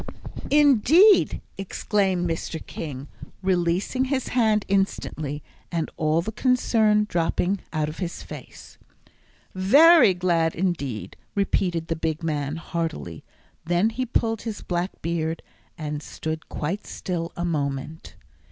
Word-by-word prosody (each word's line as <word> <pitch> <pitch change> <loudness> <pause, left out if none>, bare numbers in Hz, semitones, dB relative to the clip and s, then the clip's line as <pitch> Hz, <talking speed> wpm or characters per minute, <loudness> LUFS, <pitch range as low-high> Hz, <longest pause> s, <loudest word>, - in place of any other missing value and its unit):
"Indeed!" 295 - +5 0.2
exclaimed 190 -2 0
Mr. 165 0 -3
King, 145 -3 -6 0.4
releasing 185 +7 +1
his 265 -1 -1
hand 220 -4 +2
instantly, 155 -7 -1 0.3
and 165 -2 -2
all 155 +1 +1
the 220 - -4
concern 220 -3 +2
dropping 175 +2 0
out 155 -2 0
of 155 - -7
his 175 -2 -4
face. - - -11 0.7
"Very 275 - +6
glad 170 -2 +1
indeed!" 160 - -2 0.2
repeated 180 -4 0
the 165 - -2
big 160 0 -3
man, 150 -2 -1
heartily; 160 - -4 0.4
then 175 +6 +2
he 255 +3 -3
pulled 225 -2 0
his 220 -3 -5
black 175 +1 -3
beard, 165 -1 -2 0.3
and 150 -2 -4
stood 160 +1 -5
quite 175 +8 -3
still 170 -2 -4
a 175 - -1
moment. 145 -1 -3
175 Hz, 120 wpm, -24 LUFS, 160-210 Hz, 0.7 s, Very